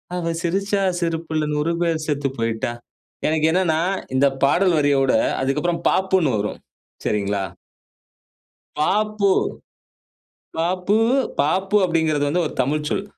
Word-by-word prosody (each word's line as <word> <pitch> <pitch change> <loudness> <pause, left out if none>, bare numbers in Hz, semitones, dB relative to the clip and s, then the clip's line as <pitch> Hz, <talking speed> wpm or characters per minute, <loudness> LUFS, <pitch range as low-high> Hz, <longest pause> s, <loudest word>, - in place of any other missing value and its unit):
அவ 170 -2 -2
சிரிச்சா 195 +3 0 0.2
சிரிப்புல 160 -2 -1
100 155 +3 0
பேரு 165 -2 +1
செத்து 145 -2 0
போயிட்டா. 115 +1 -1 0.6
எனக்கு 155 0 +2
என்னன்னா 165 -3 +2 0.3
இந்த 140 +1 +4 0.2
பாடல் 175 +4 +3
வரியோட 140 -2 +2 0.3
அதுக்கப்புறம் 150 +6 -1
பாப்புன்னு 185 - +2
வரும் 105 +1 -4 0.4
சரிங்களா. 100 -1 0 1.4
பாப்பு 210 +3 +1 1.3
பாப்பு, 180 +5 +1 0.4
பாப்பு 190 +7 +1
அப்படிங்கிறது 160 -4 +1
வந்து 175 +4 +1
ஒரு - - -10
தமிழ் 150 +3 -1
சொல். 195 - -1
160 Hz, 110 wpm, -21 LUFS, 145-185 Hz, 1.4 s, இந்த